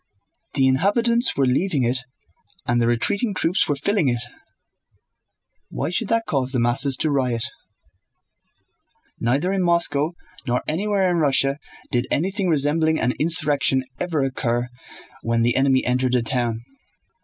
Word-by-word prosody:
The 135 -2 +3
inhabitants 230 - +2
were 135 - +3
leaving 140 +2 +1
it 125 +2 0 0.7
and 120 0 +1
the 115 - +2
retreating 200 - 0
troops 180 0 +1
were 145 - 0
filling 185 +3 0
it. 120 -1 0 1.5
Why - - -3
should 215 +4 -1
that 230 +1 0
cause 130 -2 -1
the 125 - +1
masses 130 +3 +2
to 155 - +1
riot? 125 -5 0 1.8
Neither 140 +11 0
in 195 - 0
Moscow 170 -3 +2 0.3
nor 125 0 0
anywhere 195 +4 0
in 175 - 0
Russia 140 -2 +2 0.3
did 120 +1 0
anything 190 +4 0
resembling 160 +1 +2
an 125 - +1
insurrection 145 -4 +2 0.2
ever 165 -5 -1
occur 120 -2 -2 0.5
when 115 0 0
the 120 +1 +1
enemy 135 -1 +2
entered 125 0 +1
a 120 - +1
town. 115 -2 -1
140 Hz, 140 wpm, -22 LUFS, 125-175 Hz, 1.8 s, The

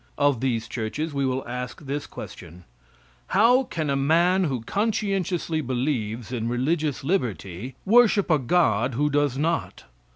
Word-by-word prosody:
Of 145 -4 +2
these 115 -3 -1
churches 140 +7 -3
we 140 -1 0
will 130 0 -2
ask 125 0 -5
this 145 +1 -4
question: 90 +2 -10 0.6
"How 245 +4 +5
can 155 -8 -3
a 140 - +1
man 170 +7 +3
who 130 -6 -2
conscientiously 195 - -1
believes 120 -4 -2
in 115 -2 -2
religious 145 +4 -1
liberty 120 - -2
worship 210 -3 +4
a 155 - +4
God 125 - +2
who 145 +3 +1
does 145 -2 +1
not?" 165 +3 -1
140 Hz, 140 wpm, -25 LUFS, 125-170 Hz, 0.6 s, How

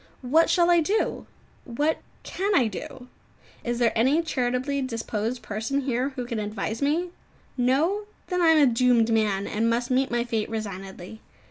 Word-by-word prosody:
What 310 +7 +3
shall 350 -1 +4
I 345 - +5
do? 395 +7 -1 0.4
What 295 +6 -1 0.2
can 395 +2 -1
I 255 - +4
do? 225 +4 -7 0.6
Is 240 0 -2
there 235 -1 +2
any 265 +9 +3
charitably 260 -1 -1
disposed 230 -1 -3
person 220 +7 -2
here 255 0 -1
who 250 - -4
can 235 -2 -3
advise 215 +2 -4
me? 325 +5 0 0.4
No? 295 +12 +1 0.2
Then 360 -1 -1
I 340 - +4
am 320 -1 +6
a 240 - +1
doomed 235 -1 +3
man, 205 -3 +1
and 225 +2 0
must 240 +2 -1
meet 265 +2 +2
my 240 0 0
fate 225 -3 -2
resignedly. 195 -1 -7
245 Hz, 165 wpm, -25 LUFS, 225-285 Hz, 0.6 s, am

